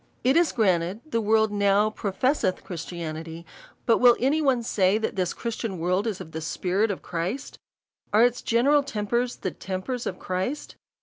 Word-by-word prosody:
It 260 +3 +3
is 340 -1 +4
granted, 185 -2 +1
the 230 - +1
world 220 0 +3
now 205 +1 +3
professeth 205 0 0
Christianity,, 165 -1 -6 0.4
but 230 - +4
will 245 -1 +7
any 280 +6 +2
one 260 -5 +2
say, 195 -2 +2
that 220 - -2
this 185 -2 0
Christian 225 -4 -4
world 180 +6 0
is 210 -4 -3
of 170 -4 -9
the 160 +1 -5
spirit 185 +6 0
of 200 - -4
Christ? 180 +11 -4 0.5
Are 220 +3 +6
its 245 0 0
general 275 +6 +3
tempers 235 0 -1
the 185 - -4
tempers 195 +7 -4
of - - -4
Christ 190 +10 -3
210 Hz, 170 wpm, -25 LUFS, 185-240 Hz, 0.5 s, will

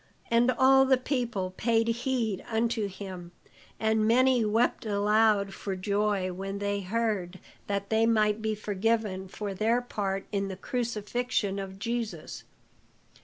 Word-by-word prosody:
And 235 +2 +4
all 265 0 +6
the 265 -1 +4
people 240 -8 -2
paid 225 0 +2
heed 230 -4 -1
unto 225 -2 0
him; 185 -3 -8 0.5
and 220 0 +2
many 250 +1 +4
wept 220 +3 +1
aloud 210 -1 +2
for 195 -2 -4
joy 200 -1 0
when 195 +2 -5
they 200 0 -1
heard 195 -3 -1 0.3
that 200 0 -3
they 220 +1 +3
might 215 -1 +2
be 220 0 -1
forgiven 210 -2 -1
for 200 +1 -5
their 225 +5 +2
part 195 -5 -3
in 200 -1 -1
the 190 -1 -6
crucifixion 230 -2 -2
of 190 -1 -6
Jesus. 230 +1 -4
215 Hz, 135 wpm, -28 LUFS, 195-230 Hz, 0.5 s, all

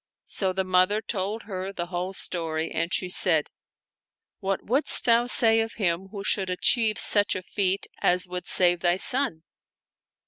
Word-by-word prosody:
So 190 -2 -2
the 190 +1 -2
mother 185 +3 +2
told 215 0 -4
her 190 -2 -6
the 175 -3 -5
whole 180 +1 -5
story, 165 -3 -1
and 170 +2 -3
she 185 - -1
said, 165 -4 +2 0.9
"What 195 -2 -3
wouldst 265 +7 +3
thou 235 0 +3
say 225 -2 +4
of 225 0 -2
him 185 -2 -2
who 200 0 -9
should 195 -2 -1
achieve 215 +4 +1
such 205 -1 +3
a 185 - -5
feat 195 0 -1
as 180 +1 +1
would 180 0 -6
save 175 -1 +3
thy 175 0 +1
son? 200 - +1
190 Hz, 165 wpm, -25 LUFS, 180-210 Hz, 0.9 s, say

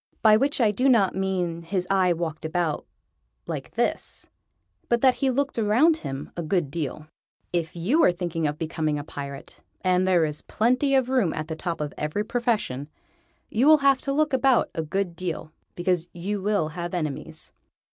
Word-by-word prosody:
By 215 -1 +7
which 275 +6 +1
I 220 -4 +4
do 255 +6 +2
not 215 -7 +4
mean 180 -3 -1
his 180 +2 -2
eye 185 -2 +3
walked 165 -2 -3
about 160 -1 -1 0.6
like - - -6
this, - - -1 0.6
but 235 -1 +2
that 260 -1 +6
he 270 - +3
looked 275 -1 0
around 245 +10 +4
him 135 - -6
a 170 - -3
good 165 -3 0
deal. 155 -1 -4 0.5
If 170 -2 -1
you 225 - +2
are - - +6
thinking 170 -3 -2
of 145 0 -3
becoming 155 -2 -1
a 145 - -4
Pirate 140 -2 -8 0.2
and 185 0 +2
there 175 -3 +4
is 150 -1 -4
plenty 255 +5 +1
of 260 -2 +3
room 250 -11 +2
at 155 +1 -4
the 160 - -3
top 170 +1 -4
of 150 -1 -3
every 150 +8 -1
profession 210 - -1 0.6
you 245 +6 +3
will 310 0 +8
have 275 -2 +5
to 275 - -2
look 300 +1 +1
about 265 -2 +3
a 160 - -2
good 175 +2 -2
deal, 170 -3 -4 0.2
because 175 -1 0
you 195 +4 -3
will 200 -6 +1
have 175 +2 -5
enemies. 160 0 -5
180 Hz, 185 wpm, -25 LUFS, 160-235 Hz, 0.6 s, will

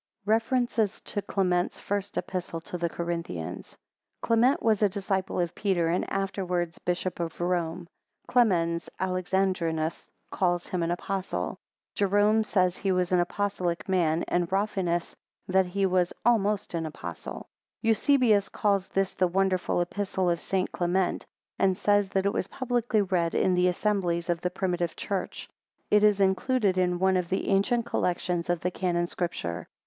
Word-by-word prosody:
REFERENCES 225 -1 +1
TO 205 - -4
CLEMENT'S 180 -3 0
FIRST 200 0 -3
EPISTLE 175 -3 -3
TO 175 - -8
THE 170 -1 -1
CORINTHIANS. 165 - -5 0.5
[Clement 235 +4 +3
was 220 -2 +3
a 205 - +4
disciple 190 -1 -2
of 175 -1 0
Peter, 180 -5 +1
and 175 - -1
afterwards 180 -3 -2
Bishop 180 +1 -2
of 165 -1 -4
Rome. 175 -1 -1 0.4
Clemens 170 -9 +2
Alexandrinus 185 -3 0 0.3
calls 175 -2 0
him 180 - -2
an 165 - 0
apostle. 175 - -3 0.3
Jerome 205 +2 +3
says 185 -4 +1
he 195 - 0
was 180 -1 +1
an 180 - +4
apostolic 180 -1 -1
man, 170 -4 +2
and 175 0 0
Rafinus 190 -4 -1 0.3
that 190 0 +3
he 195 +2 0
was 180 -1 +2
almost 210 -4 +2
an 165 -1 -2
apostle. 155 - -7 0.4
Eusebius 225 -2 +3
calls 200 -2 +1
this 195 -1 0
the 185 - +2
wonderful 185 -1 +1
Epistle 185 0 -1
of 170 - -2
St. 190 -1 -1
Clement, 180 +1 0 0.3
and 190 -2 +3
says 205 -1 +2
that 190 0 0
it 200 - +2
was - - -1
publicly 240 -4 0
read 180 -3 0
in 185 - +3
the 180 0 +3
assemblies 180 -3 0
of 170 -1 -2
the 180 - 0
primitive 175 -2 -2
church. 195 -2 -4 0.4
It 210 0 +5
is 210 -1 +5
included 195 +2 +2
in 180 -1 +1
one 190 +1 +3
of 180 -2 -2
the 190 - -1
ancient 225 +4 +2
collections 175 -5 -1
of 175 -1 0
the 180 - -1
Canon 175 -2 0
Scripture. 90 - -4
185 Hz, 155 wpm, -27 LUFS, 175-200 Hz, 0.5 s, It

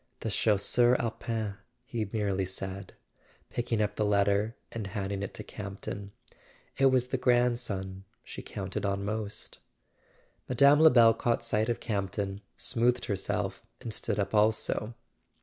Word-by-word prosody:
"The 110 - -2
Chasseur 115 +4 +3
Alpin 110 -2 -3
," 120 +1 -46
he 115 -6 -3
merely 100 -3 0
said, 95 +1 -5 0.6
picking 115 -3 0
up 105 - -3
the 110 - +1
letter 100 +2 +2 0.2
and 110 -3 -4
handing 100 0 -3
it 100 - -5
to - - -6
Campton. 100 0 -7 0.6
"It 135 - +4
was 130 -1 +2
the 130 - -1
grandson 120 -7 +1 0.2
she - - -8
counted - - -5
on 100 0 -1
most." 105 0 -4 0.9
Mme. 140 +4 +6
Lebel 120 -8 +7
caught 120 0 -1
sight 110 0 +1
of 120 - 0
Campton, 100 -2 -2 0.2
smoothed 120 +1 +2
herself 100 -2 -2 0.2
and 115 - -5
stood 100 - -2
up 100 0 -1
also. 110 +1 +1
110 Hz, 140 wpm, -29 LUFS, 100-120 Hz, 0.9 s, Lebel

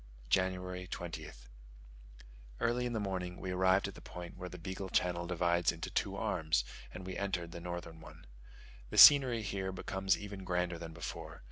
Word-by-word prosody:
January 90 -1 0
20th. 80 -9 -7 1.1
Early 120 +1 +1
in 120 - -4
the 110 - 0
morning 95 -3 -3
we 95 - -4
arrived 95 +1 +3
at - - -7
the - - -12
point 90 -1 -9
where 90 - -7
the 90 - -9
Beagle 95 +1 -5
Channel 85 -1 0
divides 85 -1 +2
into - - -6
two - - -1
arms; 80 -7 0 0.3
and 95 - -8
we 95 - -5
entered 90 -4 -2
the 85 - -8
northern 85 -2 -6
one. - - -13 0.6
The - - -5
scenery 130 -6 +9
here 95 -1 -2
becomes 95 0 0
even 100 -2 -7
grander 90 -1 -1
than 80 -1 -7
before. 80 -1 -7
90 Hz, 170 wpm, -34 LUFS, 85-95 Hz, 1.1 s, scenery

